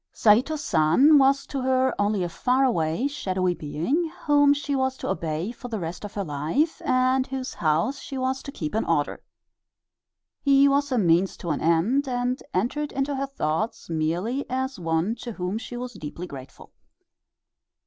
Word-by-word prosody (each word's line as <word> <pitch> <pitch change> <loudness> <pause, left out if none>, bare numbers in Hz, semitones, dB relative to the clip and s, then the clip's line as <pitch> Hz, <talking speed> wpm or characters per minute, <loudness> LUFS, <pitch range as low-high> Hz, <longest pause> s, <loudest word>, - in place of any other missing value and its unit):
Saito 235 +8 +4
San 280 - +4
was 275 +1 +3
to 275 - -4
her 260 0 +2
only 205 -2 +1
a - - -1
far 255 +9 +1
away, 170 -3 +1
shadowy 185 -10 -1
being, 215 - -2
whom 290 -1 +5
she 285 0 0
was 260 0 0
to - - -5
obey 165 +1 -2
for 245 +1 -9
the 230 -3 -3
rest 170 +1 -5
of 205 - -8
her 200 - -1
life 160 - -1
and 255 +1 +2
whose 265 -1 -4
house 165 - 0
she 270 - -7
was 260 +1 -1
to 280 - -8
keep 155 - -5
in 220 - +1
order. 150 -3 0 1.2
He 275 0 +5
was 280 0 +1
a 255 - +1
means 180 -2 +2
to 170 - -4
an 150 - -2
end, 190 - +2
and 250 +1 -1
entered 270 +10 -1
into 275 +1 -1
her 275 +1 -2
thoughts 190 - -3
merely 175 - -1
as 260 -2 -2
one 165 +4 0
to 235 - -7
whom 185 +2 -3
she 245 +1 -7
was 250 0 -5
deeply 170 -1 -7
grateful. 135 -5 -11
245 Hz, 175 wpm, -25 LUFS, 170-270 Hz, 1.2 s, whom